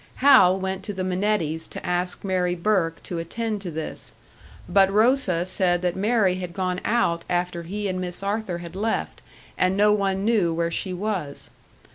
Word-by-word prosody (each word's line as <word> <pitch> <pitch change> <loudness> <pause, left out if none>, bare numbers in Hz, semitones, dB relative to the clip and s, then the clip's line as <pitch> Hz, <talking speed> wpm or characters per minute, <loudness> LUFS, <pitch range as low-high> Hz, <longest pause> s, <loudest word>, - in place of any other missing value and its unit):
Hal 255 -9 +6
went 190 0 -3
to 205 - -4
the 185 -1 -3
Minettis 180 -4 -1
to - - -8
ask 180 0 -2
Mary 180 -2 0
Burke 170 -3 0
to 175 - -4
attend 215 +5 -3
to 185 - -5
this; 160 -1 -5 0.5
but 195 -1 +4
Rosa 210 -5 +2
said 180 -1 +1
that 180 -1 0
Mary 195 -2 +2
had 180 -2 -6
gone 185 -1 -2
out 170 -8 +1
after 175 -1 -1
he 200 +5 -4
and 185 -1 -2
Miss 180 +1 -1
Arthur 200 -3 -2
had 170 0 -9
left, 220 +3 -2 0.4
and 185 +1 +2
no 210 +1 +5
one 195 -1 0
knew 200 -8 +2
where 170 0 0
she 185 +3 -2
was. 180 -6 -4
185 Hz, 175 wpm, -24 LUFS, 175-205 Hz, 0.5 s, Hal